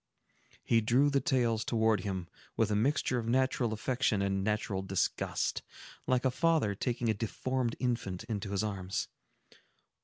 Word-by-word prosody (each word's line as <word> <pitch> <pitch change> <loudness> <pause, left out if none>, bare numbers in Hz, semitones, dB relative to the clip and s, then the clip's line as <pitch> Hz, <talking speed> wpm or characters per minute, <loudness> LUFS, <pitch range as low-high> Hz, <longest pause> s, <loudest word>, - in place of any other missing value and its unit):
He 115 -1 +3
drew 125 +6 +3
the 140 -1 +2
tales 115 -4 +1
towards 110 -4 +2
him, 95 -3 -3 0.3
with 110 -2 +2
a - - +2
mixture 125 +2 +1
of 115 - -4
natural 130 -1 +1
affection 115 -1 0
and 95 0 0
natural 105 -2 -1
disgust, 95 -1 -1 0.5
like 130 0 +2
a 130 - +3
father 160 -7 +2
taking 120 +3 -2
a - - +4
deformed 120 +3 -2
infant 115 -7 -2
into 105 -3 -4
his 100 +1 0
arms. 95 -3 -3
115 Hz, 150 wpm, -31 LUFS, 100-125 Hz, 0.5 s, a